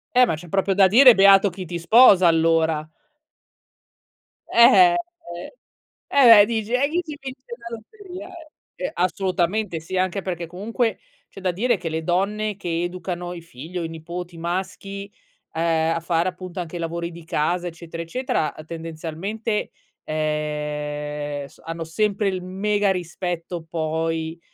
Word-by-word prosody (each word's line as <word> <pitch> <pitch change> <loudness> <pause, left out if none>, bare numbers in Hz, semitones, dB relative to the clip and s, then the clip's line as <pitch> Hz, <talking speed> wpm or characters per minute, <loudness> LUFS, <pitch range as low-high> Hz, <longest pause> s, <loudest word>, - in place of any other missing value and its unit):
Eh, 250 0 +7
ma 165 - -1
c'è 175 +3 -11
proprio 195 +1 +1
da 195 0 +6
dire: 250 +5 +8
"Beato 195 0 +6
chi 185 0 -7
ti 175 0 -5
sposa 185 0 +6
allora." 160 -1 +2 1.6
Eh, 345 +10 +7
eh, - - 0 1.1
eh. 235 -6 +8
Eh, - - +5
dici, 225 0 -3
e 280 +3 +2
chi 350 +3 0
ti 300 -4 -8
vince 260 -1 -8
la 235 -1 -7
lotteria? 370 - -11 0.5
Ehm, 185 - -4
assolutamente 185 0 0
sì, 175 +4 -5
anche 185 +1 0
perché 175 -2 -4
comunque 220 +7 -2 0.3
c'è 195 - -12
da 185 -1 +1
dire 230 +4 +1
che 170 -2 -5
le 160 0 -3
donne 205 +4 0
che 175 -3 -2
educano 175 0 -4
i 170 - -8
figli 165 +3 -9
o 170 - -2
i - - -2
nipoti 170 +2 -7
maschi, 195 +3 -5 0.4
ehm, 165 0 +1
a - - -1
fare 170 +1 0
appunto 180 0 -8
anche 175 0 -5
lavori 170 +1 -4
di 165 -1 -12
casa 175 +3 -1
eccetera 165 0 -7
eccetera, 165 - -2
tendenzialmente, 165 +7 -4 0.3
ehm, 150 -1 -3
s - - -21
hanno 165 0 -5
sempre 205 +5 0
il 185 -2 -1
mega 200 +2 0
rispetto 175 -1 -4
poi, 160 0 -2
175 Hz, 150 wpm, -23 LUFS, 165-205 Hz, 1.6 s, dire